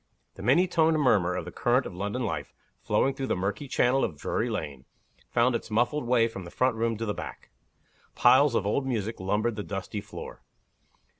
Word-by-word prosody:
THE - - -11
many 140 - +4
toned 160 -2 +3
murmur 95 -10 +3
of 90 - -3
the 90 - -7
current 125 +7 +1
of - - -6
London 105 +7 -3
life 80 -8 -4 0.3
flowing 135 - +1
through 135 -1 -4
the - - +1
murky 100 +8 -3
channel 130 +1 +2
of - - -2
Drury 120 - -1
Lane 75 - -5 0.4
found 120 +1 +2
its 115 - -3
muffled 120 +5 0
way 120 -2 +4
from 95 -5 -8
the 85 - -9
front 125 +5 +1
room 115 0 0
to 115 - -3
the 105 - -1
back. - - -8 0.6
Piles 130 +1 +5
of 100 - +1
old 135 +6 0
music 110 -3 -2
lumbered 105 +4 0
the - - -2
dusty 100 +1 -5
floor. 100 0 -9
115 Hz, 200 wpm, -27 LUFS, 100-130 Hz, 0.6 s, Piles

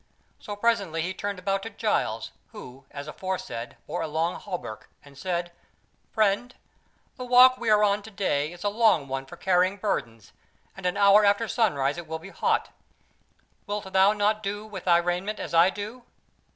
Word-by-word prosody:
So 205 - -7
presently 200 -7 0
he 185 +2 -3
turned 200 +1 -4
about 195 +1 -1
to 225 - -6
Giles, - - -1 0.2
who, 135 - -11
as 140 +1 -8
aforesaid, 150 -9 -5
bore - - -4
a 160 - -2
long 160 +3 0
hauberk, 180 - -7 0.2
and 140 -1 -16
said: 175 +2 -3 0.6
"Friend, 220 +3 +1 0.6
the 255 - -5
walk 250 +1 +6
we 235 - -1
are 210 0 +5
on 205 0 +2
to 215 - -11
day 155 -7 -1
is 175 0 -11
a 205 - +2
long 210 -9 +3
one 135 0 -4
for 175 - -11
carrying 185 +2 +2
burdens, 115 - -3 0.4
and 195 -2 -3
an 180 - -1
hour 200 +1 +6
after 205 +3 +3
sunrise 150 - +1
it 170 - -9
will 160 +1 -4
be 170 +4 -11
hot. - - 0 1.0
Wilt 205 -2 -4
thou 190 +1 +6
not 210 +1 +1
do 205 +1 -4
with 205 -4 -8
thy 175 -2 +5
raiment 180 +5 -2
as - - -6
I 170 +2 +6
do?" 210 +5 -7
195 Hz, 180 wpm, -26 LUFS, 170-210 Hz, 1.0 s, walk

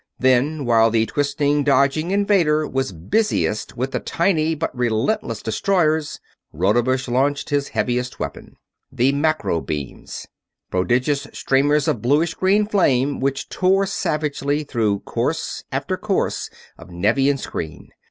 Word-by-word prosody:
Then 130 +3 +2
while 115 -1 +4
the 110 0 +2
twisting, 145 +2 0
dodging 140 +4 +2
invader 190 -7 +2
was 135 -4 -2
busiest 105 - -1
with 130 +2 -2
the - - -1
tiny 165 -3 0
but 160 -3 -3
relentless 120 - -1
destroyers, 155 - 0 0.3
Rodebush 120 - +1
launched 140 +4 0
his 145 -1 +1
heaviest 125 0 -2
weapon. - - -6 0.4
The 130 +3 +2
macro 145 - 0
beams! 75 -4 -6 0.5
Prodigious 125 +9 0
streamers 145 +2 +2
of 110 - 0
bluish 150 +7 +2
green 200 +3 +2
flame 145 - +1
which 135 0 -1
tore 195 +1 +2
savagely 150 -5 -1
through 110 -8 -1
course - - -3
after - - -2
course - - -1 0.3
of - - -13
Nevian 120 +11 +1
screen! 80 - -6
140 Hz, 125 wpm, -21 LUFS, 120-155 Hz, 0.5 s, while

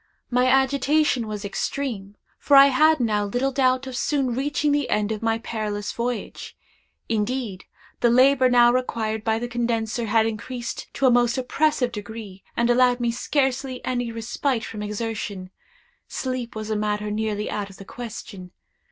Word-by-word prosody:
My 250 +1 +3
agitation 270 -1 +2
was 210 -1 -5
extreme; 205 -2 -3 0.2
for 285 - +5
I 275 0 +9
had 310 +3 +5
now 215 -4 +1
little 245 +7 -1
doubt 255 0 +2
of 260 -1 -6
soon 270 -1 0
reaching 290 +3 0
the 290 -2 0
end 210 0 0
of 215 - -3
my 225 0 +1
perilous 215 -2 -4
voyage. 235 -2 -4 0.5
Indeed, 220 -2 -2 0.3
the 240 - +3
labor 255 +1 +5
now 240 -1 +6
required 225 -3 -1
by 220 0 +1
the 240 +2 -3
condenser 235 -1 -1
had 220 +1 +3
increased 235 +2 -5
to 275 - +1
a 255 - +6
most 240 +1 +3
oppressive 260 0 +1
degree, 210 -2 -8
and 235 0 +3
allowed 245 0 +4
me 240 -1 +1
scarcely 265 +1 -1
any 245 -2 -1
respite 230 +2 -2
from 215 -2 -7
exertion. 210 -3 -4 0.6
Sleep 255 -3 -4
was 220 0 -5
a - - +1
matter 210 0 -1
nearly 210 -1 -2
out 205 -1 -3
of 195 - -14
the 195 - -11
question. 205 -5 -8
235 Hz, 160 wpm, -24 LUFS, 215-255 Hz, 0.6 s, I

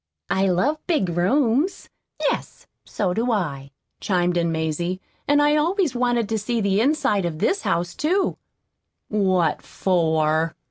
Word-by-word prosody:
"I 190 0 +2
love 230 - +1
big 305 - +1
rooms." 245 - +1 0.3
"Yes, - - -2 0.2
so 190 -4 -1
do 235 +5 0
I," 145 -10 -2 0.3
chimed 180 -2 0
in 170 -1 +1
Mazie. 160 +3 -2 0.3
"And 290 0 +4
I 295 +1 +4
always 335 0 +1
wanted 240 -2 +1
to 220 -1 0
see 235 +3 -1
the 200 0 +1
inside 265 -7 +1
of 170 -3 -3
this 385 - +1
house, 175 +1 -1
too." 370 +6 0 0.7
"What 185 -6 +1
for?" 160 -3 0
195 Hz, 140 wpm, -23 LUFS, 175-265 Hz, 0.7 s, And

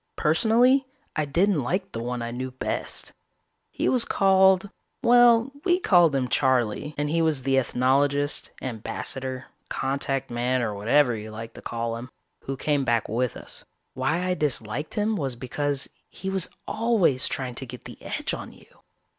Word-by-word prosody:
Personally 240 - +3 0.3
I 155 - +1
didn't 170 +3 +2
like 185 +10 -2
the 115 - -4
one 120 0 -3
I 115 - -4
knew 130 +2 -4
best. 130 - -4 0.6
He - - -2
was 250 -2 +3
called 190 0 +4 0.3
well, 240 +1 +6
we 360 -1 +3
called 175 - +5
him 130 -2 +1
Charley, 130 +2 +1
and 145 0 0
he 165 +3 +1
was 155 -5 +1
the 135 0 +3
ethnologist, 140 +3 +1
ambassador, 130 +2 -4 0.2
contact 135 -1 -1
man, 125 +1 0
or 110 -2 -1
whatever 120 +5 +3
you 110 0 -7
like 115 +1 -8
to - - -11
call 115 0 -3
him, 120 +2 -8 0.4
who 135 0 -3
came 145 0 +1
back 115 -3 +1
with 120 +2 -1
us. - - -5 0.3
Why 135 +7 0
I 185 - +1
disliked 145 -3 -2
him 210 +1 +1
was 135 -6 -2
because 140 +3 -2 0.2
he 190 - -5
was 190 -2 0 0.2
always 215 - +2
trying 130 -2 -3
to 130 +2 -5
get 125 0 -10
the - - -10
edge - - -3
on - - -6
you. - - -21
140 Hz, 165 wpm, -25 LUFS, 125-180 Hz, 0.6 s, well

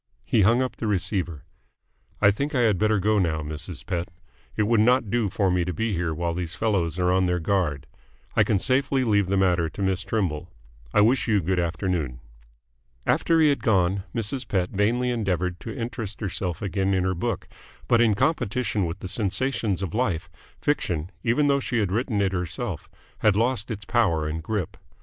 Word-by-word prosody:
He 115 - +2
hung 115 +6 +4
up 130 - -4
the 110 - -3
receiver. 90 -5 -1 0.8
"I 100 - +7
think 140 +8 -3
I 125 - +3
had 110 -6 +3
better 110 0 +3
go 105 +2 +2
now, 80 -4 0
Mrs. 80 +2 -6
Pett. 85 -2 -2 0.5
It 105 - +2
would 115 +1 +3
not 120 -1 +3
do 115 -4 +1
for 95 0 +1
me 90 -1 +2
to 90 +1 -3
be 110 +4 -1
here 85 -2 -1
while 85 +2 -2
these 85 0 -4
fellows 95 -7 0
are 90 0 +2
on 95 0 +3
their 90 0 +1
guard. 85 -5 0 0.5
I - - +5
can 105 - +2
safely 130 +4 +1
leave 100 -5 +2
the 100 +1 +1
matter 90 -3 +2
to 90 - -8
Miss 95 -1 +1
Trimble. 90 -7 -2 0.4
I - - +4
wish 120 +6 +3
you 105 -3 +3
good 90 +1 0
afternoon." 85 -6 -2 0.9
After 165 -1 +3
he 155 - +6
had 140 - 0
gone, 95 -2 +2
Mrs. 120 +2 -3
Pett 90 -3 0
vainly 120 +5 +1
endeavoured 90 -6 -1
to 115 - -7
interest 115 -3 -5
herself 90 -3 -3
again 95 0 0
in 95 - +1
her 95 0 +1
book, 85 - -3 0.4
but 115 -1 +4
in 110 -3 +4
competition 110 - 0
with 85 +4 -6
the - - -5
sensations 100 0 -1
of 95 - -4
life, 105 -8 -1 0.3
fiction, 90 - -1
even 125 +5 +2
though 140 -1 +3
she 125 -2 -2
had 100 -5 +1
written 110 0 0
it 95 -1 0
herself, 90 +2 -4 0.3
had 105 -3 +3
lost 115 0 +1
its 105 -3 -5
power 95 -8 +1
and 80 +1 -3
grip. 100 +3 -3
100 Hz, 195 wpm, -25 LUFS, 90-115 Hz, 0.9 s, I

